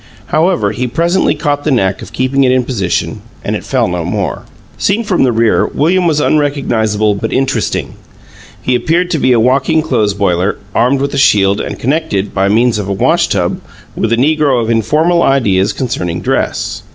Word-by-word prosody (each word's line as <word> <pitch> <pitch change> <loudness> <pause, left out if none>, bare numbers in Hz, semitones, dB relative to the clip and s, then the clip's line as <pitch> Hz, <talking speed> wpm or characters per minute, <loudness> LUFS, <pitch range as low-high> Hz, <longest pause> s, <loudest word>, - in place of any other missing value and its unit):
However, 160 - +1
he 125 +4 -3
presently 170 +8 +1
caught 145 -1 -2
the - - -1
knack 100 -8 0
of - - -10
keeping 130 +2 0
it 130 - +3
in 130 0 +2
position, 105 -8 -2 0.2
and - - -1
it - - -5
fell - - 0
no 90 -1 -3
more. 85 - -3 0.3
Seen 205 +4 0
from 205 -5 0
the 130 - +3
rear, 115 -1 +2
William 175 +4 +1
was 155 -2 +1
unrecognizable 115 -9 +1
but 105 +3 -4
interesting. 135 -4 -1 0.7
He 125 - 0
appeared 165 +9 0
to 160 - 0
be 130 0 +2
a 120 - +4
walking 135 +6 +2
clothes 110 -9 0
boiler, 95 -1 0 0.2
armed 130 +3 +2
with 140 0 -2
a 140 - 0
shield 100 -6 +3
and - - -5
connected, 130 -8 -1
by 95 0 +1
means 115 +1 +2
of 100 - -4
a - - -2
wash 95 - +2
tub, - - -1 0.3
with 115 - -1
a 115 - +2
negro 145 -1 +2
of 115 0 -1
informal 155 +10 +2
ideas 100 - +2
concerning 90 -10 -3
dress. - - -2
125 Hz, 190 wpm, -13 LUFS, 105-150 Hz, 0.7 s, a